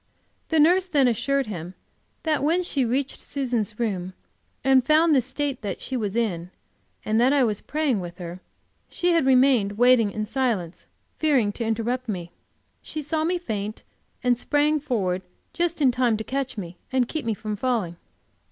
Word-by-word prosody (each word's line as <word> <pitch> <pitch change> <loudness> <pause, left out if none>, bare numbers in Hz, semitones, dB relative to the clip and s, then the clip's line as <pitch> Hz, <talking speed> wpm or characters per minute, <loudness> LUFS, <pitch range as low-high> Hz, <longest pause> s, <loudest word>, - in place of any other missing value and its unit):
The 320 - +2
nurse 355 +5 +5
then 285 -7 +3
assured 270 +4 +1
him 180 -4 -7 0.5
that 310 -3 +1
when 335 +5 +2
she 275 -7 0
reached 265 +4 -1
Susan's 240 -6 -3
room 190 -5 -2 0.5
and 265 -1 +5
found 310 +3 +4
the 270 - +5
state 270 +2 -3
that 200 -4 -4
she 265 - -5
was 210 -4 -2
in, 180 -7 -1 0.6
and 220 +2 +2
that 255 +2 +5
I 280 -2 +4
was 215 -4 0
praying 295 -7 0
with 175 -1 -7
her, 175 0 -7 0.5
she 355 0 +1
had 330 -5 +3
remained 255 -6 +4
waiting 245 -2 +5
in 215 +1 -3
silence, 215 -8 -2 0.3
fearing 270 -10 +3
to 230 - -4
interrupt 235 +3 -1
me. 175 -4 -4 0.5
She 310 -1 -5
saw 310 +2 -1
me 355 +3 +1
faint, 215 - -4 0.4
and 245 -1 +2
sprang 295 +3 +2
forward 195 -10 -1 0.3
just 340 -3 0
in 260 - +5
time 245 -3 +1
to 220 - -4
catch 265 0 -3
me 175 -3 -6
and 255 -2 +2
keep 315 +3 -4
me 225 -2 -1
from 210 +1 -4
falling. 215 -7 -1
250 Hz, 175 wpm, -24 LUFS, 210-285 Hz, 0.6 s, nurse